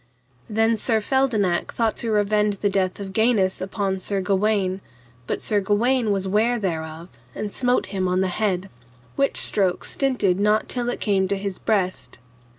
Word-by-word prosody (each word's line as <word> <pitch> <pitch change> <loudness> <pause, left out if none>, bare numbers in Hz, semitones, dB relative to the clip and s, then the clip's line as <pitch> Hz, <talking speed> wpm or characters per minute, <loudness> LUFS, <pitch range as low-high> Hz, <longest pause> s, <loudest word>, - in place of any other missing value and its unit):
Then 225 +1 +2
Sir 225 0 +1
Feldenak 215 -7 0
thought 225 -2 +1
to 230 - -3
revenge 210 -1 +1
the 205 +1 0
death 190 -1 0
of 195 -1 -6
Gainus 220 -4 +2
upon 190 0 -2
Sir 195 +1 -2
Gawaine, 195 0 0 0.5
but - - -3
Sir 210 - +2
Gawaine 225 +4 +1
was 195 -1 -1
ware 220 +5 +2
thereof, 165 -4 -4 0.2
and 210 -1 -4
smote 250 -1 +1
him 190 -1 0
on 180 +1 +1
the 190 - +1
head, 190 -1 -1 0.4
which 275 0 +1
stroke 190 -3 +2
stinted 245 -9 0
not 210 +1 +2
till 245 -1 -2
it - - -3
came 195 -3 +1
to 200 +1 -1
his 195 -1 -5
breast. 190 -4 -1
205 Hz, 165 wpm, -23 LUFS, 190-220 Hz, 0.5 s, Then